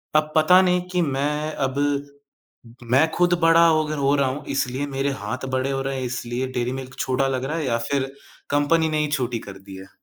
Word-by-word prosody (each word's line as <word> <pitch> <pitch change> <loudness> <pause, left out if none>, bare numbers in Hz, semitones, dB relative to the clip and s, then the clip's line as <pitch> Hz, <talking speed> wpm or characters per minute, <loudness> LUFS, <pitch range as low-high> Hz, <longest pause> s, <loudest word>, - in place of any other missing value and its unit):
अब 155 0 +2
पता 180 +4 +6
नहीं 180 -1 +2
कि 180 -1 +1
मैं 150 +1 -1 0.2
अब 130 +1 -7 1.1
मैं 135 +6 +5
खुद 175 0 +3
बड़ा 165 +1 +6
होगर 155 -2 +1
हो 140 0 +2
रहा 140 -2 +2
हूँ, 140 +3 -5
इसलिए 135 +1 -1
मेरे 135 0 -1
हाथ 130 +1 -4
बड़े 130 +1 0
हो 135 0 -1
रहे 135 0 -3
हैं, 130 - -3
इसलिए 125 +1 -3
डेयरी 125 -1 -2
मिल्क 130 0 -11
छोटा 130 +1 0
लग 130 -1 -2
रहा 155 +4 -2
है, 160 - -2
या 115 -2 +1
फिर 135 -1 0 0.4
कंपनी 150 +3 +2
ने 155 - -1
ही 150 - +1
छोटी 120 -3 -2
कर 100 -2 -10
दी 95 0 -12
है। 95 0 -11
135 Hz, 215 wpm, -23 LUFS, 130-155 Hz, 1.1 s, पता